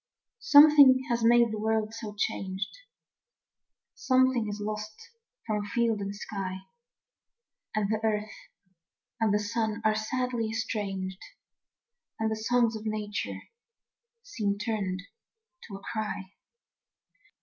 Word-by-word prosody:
SOMETHING 285 Hz, -, +8 dB
has 235 Hz, -1 st, 0 dB
made 235 Hz, 0 st, +5 dB
the 215 Hz, -, -4 dB
world 220 Hz, 0 st, 0 dB
so 220 Hz, -2 st, -7 dB
changed, 195 Hz, -, -3 dB, 1.2 s
Something 255 Hz, -3 st, +2 dB
is 205 Hz, +1 st, -5 dB
lost 215 Hz, +1 st, -6 dB, 0.3 s
from 210 Hz, -2 st, -1 dB
field 225 Hz, +1 st, 0 dB
and 200 Hz, 0 st, -4 dB
sky, 190 Hz, -2 st, -5 dB, 1.1 s
And 215 Hz, -2 st, +1 dB
the 215 Hz, +1 st, 0 dB
earth 215 Hz, -1 st, 0 dB, 0.9 s
and 210 Hz, -2 st, +2 dB
sun 220 Hz, +1 st, -2 dB
are 215 Hz, -, +4 dB
sadly 230 Hz, +1 st, -2 dB
estranged, 195 Hz, -4 st, -3 dB, 1.0 s
And 220 Hz, 0 st, 0 dB
the -, -, 0 dB
songs 230 Hz, +1 st, +1 dB
of 215 Hz, -, -5 dB
Nature 210 Hz, -1 st, -3 dB, 0.8 s
seemed 205 Hz, -, -2 dB
turned 195 Hz, -4 st, -2 dB, 0.6 s
to 200 Hz, -, -8 dB
a 195 Hz, -, -9 dB
cry. 210 Hz, -3 st, -4 dB
215 Hz, 110 wpm, -28 LUFS, 205-230 Hz, 1.2 s, SOMETHING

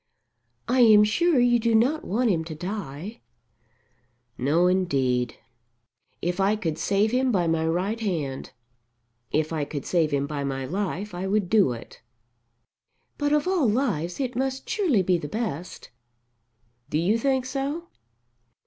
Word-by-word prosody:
"I 255 Hz, +2 st, +2 dB
am 215 Hz, -3 st, +7 dB
sure 305 Hz, +8 st, +2 dB
you 240 Hz, 0 st, +4 dB
do 230 Hz, 0 st, +2 dB
not 265 Hz, +8 st, +2 dB
want 230 Hz, +3 st, +1 dB
him 165 Hz, -3 st, 0 dB
to 160 Hz, -1 st, -7 dB
die." 185 Hz, +2 st, -6 dB, 1.2 s
"No, 150 Hz, +7 st, +2 dB
indeed. 135 Hz, -10 st, +1 dB, 0.9 s
If 175 Hz, +2 st, -1 dB
I 195 Hz, +2 st, +3 dB
could 165 Hz, -7 st, -3 dB
save 205 Hz, +2 st, +1 dB
him 255 Hz, +1 st, +2 dB
by 185 Hz, -6 st, +1 dB
my 160 Hz, -1 st, +1 dB
right 185 Hz, +7 st, -1 dB
hand, 155 Hz, -11 st, -3 dB, 0.8 s
if 155 Hz, +1 st, 0 dB
I 155 Hz, -2 st, -1 dB
could 145 Hz, -1 st, -5 dB
save 165 Hz, -4 st, +1 dB
him 140 Hz, -1 st, 0 dB
by 145 Hz, -1 st, -4 dB
my 135 Hz, -1 st, -3 dB
life, 195 Hz, +4 st, -3 dB
I 180 Hz, +2 st, -3 dB
would 200 Hz, -2 st, 0 dB
do 205 Hz, -, +4 dB
it." 115 Hz, -, -11 dB, 1.2 s
"But 290 Hz, 0 st, 0 dB
of 300 Hz, +2 st, +2 dB
all 355 Hz, -, +2 dB
lives 205 Hz, -, -1 dB
it 255 Hz, -3 st, -2 dB
must 265 Hz, +1 st, -2 dB
surely 340 Hz, -, +2 dB
be 180 Hz, -1 st, +2 dB
the 150 Hz, -, -5 dB
best." 180 Hz, -, -5 dB, 1.0 s
"Do 150 Hz, -, 0 dB
you 195 Hz, +8 st, +2 dB
think 265 Hz, 0 st, +1 dB
so? 275 Hz, +5 st, -3 dB
195 Hz, 150 wpm, -25 LUFS, 160-245 Hz, 1.2 s, am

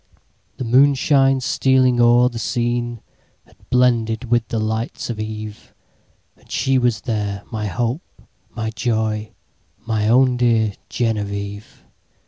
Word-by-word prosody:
The -, -, -4 dB
moonshine 135 Hz, +2 st, +3 dB
stealing 130 Hz, -1 st, +2 dB
o'er 120 Hz, +1 st, +5 dB
the 120 Hz, -2 st, -5 dB
sceneHad 120 Hz, +3 st, -2 dB, 0.7 s
blended 120 Hz, -1 st, +1 dB
with 120 Hz, -2 st, +2 dB
the 115 Hz, -, -3 dB
lights 110 Hz, +2 st, -3 dB
of 110 Hz, -, -6 dB
eve; 110 Hz, -1 st, -7 dB, 0.6 s
And -, -, -26 dB
she 135 Hz, -1 st, +1 dB
was 120 Hz, -4 st, 0 dB
there, 105 Hz, -3 st, -3 dB
my 105 Hz, -2 st, -3 dB
hope, 120 Hz, -, -4 dB, 0.3 s
my 110 Hz, -1 st, -4 dB
joy, 110 Hz, -1 st, -2 dB, 0.5 s
My 110 Hz, -2 st, 0 dB
own 125 Hz, +2 st, +4 dB
dear 115 Hz, -4 st, +2 dB, 0.2 s
Genevieve! 100 Hz, -2 st, -4 dB
115 Hz, 115 wpm, -20 LUFS, 110-125 Hz, 0.7 s, o'er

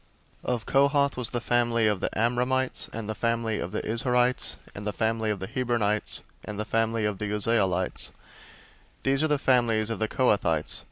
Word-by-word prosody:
003:027 -, -, +1 dB
Of 115 Hz, -, -8 dB
Kohath 140 Hz, 0 st, +3 dB
was 125 Hz, -3 st, -1 dB
the 120 Hz, -, -2 dB
family 120 Hz, -1 st, +2 dB
of 105 Hz, -3 st, +2 dB
the -, -, -1 dB
Amramites, 125 Hz, +3 st, +1 dB
and 110 Hz, -2 st, -5 dB
the 110 Hz, -, -2 dB
family 115 Hz, -1 st, -1 dB
of 85 Hz, -, -4 dB
the 105 Hz, -, -3 dB
Izharites, 125 Hz, +2 st, +1 dB, 0.2 s
and 100 Hz, +1 st, -6 dB
the 105 Hz, -, -1 dB
family 110 Hz, 0 st, 0 dB
of 105 Hz, -, 0 dB
the 95 Hz, -, -5 dB
Hebronites, 115 Hz, -4 st, 0 dB, 0.2 s
and 105 Hz, -1 st, -6 dB
the 105 Hz, -, -2 dB
family 115 Hz, 0 st, 0 dB
of 105 Hz, -2 st, -2 dB
the 105 Hz, -, -2 dB
Uzzielites: 100 Hz, -3 st, +1 dB, 0.9 s
these 135 Hz, +1 st, +1 dB
are 155 Hz, -, +3 dB
the 150 Hz, -1 st, +2 dB
families 115 Hz, -5 st, +2 dB
of 115 Hz, -, -3 dB
the 110 Hz, -, 0 dB
Kohathites. 100 Hz, -, +1 dB
115 Hz, 185 wpm, -27 LUFS, 105-125 Hz, 0.9 s, Kohath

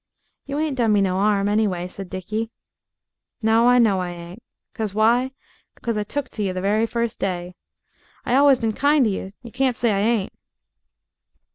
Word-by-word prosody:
"You 280 Hz, +1 st, -3 dB
ain't 300 Hz, -3 st, -1 dB
done 225 Hz, -3 st, +3 dB
me 205 Hz, -, +3 dB
no 185 Hz, -1 st, +1 dB
'arm, 200 Hz, 0 st, +2 dB
anyway," 205 Hz, -4 st, 0 dB
said 185 Hz, 0 st, -9 dB
Dickie. 215 Hz, +4 st, -4 dB, 0.9 s
"No 225 Hz, +2 st, +4 dB
I 245 Hz, -, +5 dB
know 215 Hz, -6 st, +4 dB
I 180 Hz, -1 st, -3 dB
ain't. 175 Hz, +4 st, -9 dB, 0.3 s
'Cause 215 Hz, -4 st, -4 dB
why? 235 Hz, +4 st, +3 dB, 0.5 s
'Cause 230 Hz, -1 st, -2 dB
I 210 Hz, -, -1 dB
took 275 Hz, +6 st, -4 dB
to 215 Hz, -, -4 dB
you 190 Hz, -2 st, -1 dB
the 185 Hz, -, -3 dB
very 210 Hz, +4 st, +1 dB
first 235 Hz, -1 st, -2 dB
day. 180 Hz, -1 st, -3 dB, 0.7 s
I -, -, 0 dB
allus 275 Hz, 0 st, +6 dB
been 225 Hz, -2 st, -1 dB
kind 285 Hz, +2 st, +3 dB
to 215 Hz, -, +1 dB
you 190 Hz, 0 st, -5 dB
you 235 Hz, -, -10 dB
can't 255 Hz, 0 st, 0 dB
say 235 Hz, -2 st, +1 dB
I 200 Hz, -, +1 dB
ain't." 215 Hz, -1 st, 0 dB
215 Hz, 185 wpm, -22 LUFS, 195-240 Hz, 0.9 s, allus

